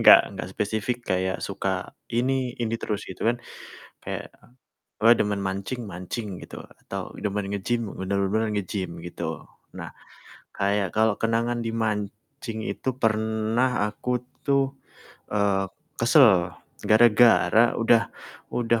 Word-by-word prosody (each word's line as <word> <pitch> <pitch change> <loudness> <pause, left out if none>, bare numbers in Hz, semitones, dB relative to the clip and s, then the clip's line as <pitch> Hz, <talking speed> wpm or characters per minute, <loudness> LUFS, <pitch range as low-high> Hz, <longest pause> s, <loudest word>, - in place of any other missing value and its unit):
enggak - - +10
enggak - - -6
spesifik 110 +4 -1
kayak 95 0 0
suka - - -3 0.2
ini, 125 +1 +1
ini 115 -1 -1
terus 105 -1 -3
gitu 95 - -6
kan. 120 - +2 0.7
Kayak - - -6 0.7
gue 115 - +7
demen 105 -1 0
mancing 100 +5 -3
mancing 95 +2 -5
gitu - - -9 0.3
atau - - -4
demen 100 -1 -2
nge-gym, 110 +2 -1
bener-bener 100 +3 0
nge-gym 95 -3 -3
gitu. 80 -2 -5 0.3
Nah, - - -6 0.7
kayak 100 -2 0
kalau 110 -1 +3
kenangan 115 +1 0
di 115 - -1
mancing 110 +2 -3
itu 130 - -2
pernah 110 +1 +1
aku 125 +3 -2 0.2
tuh, 140 -1 +3 0.7
eee, 100 -2 +2 0.3
kesel 105 - +5 0.3
gara-gara 115 +1 +5
udah 115 0 +4 0.4
udah 115 -1 +1
110 Hz, 120 wpm, -25 LUFS, 100-120 Hz, 0.7 s, enggak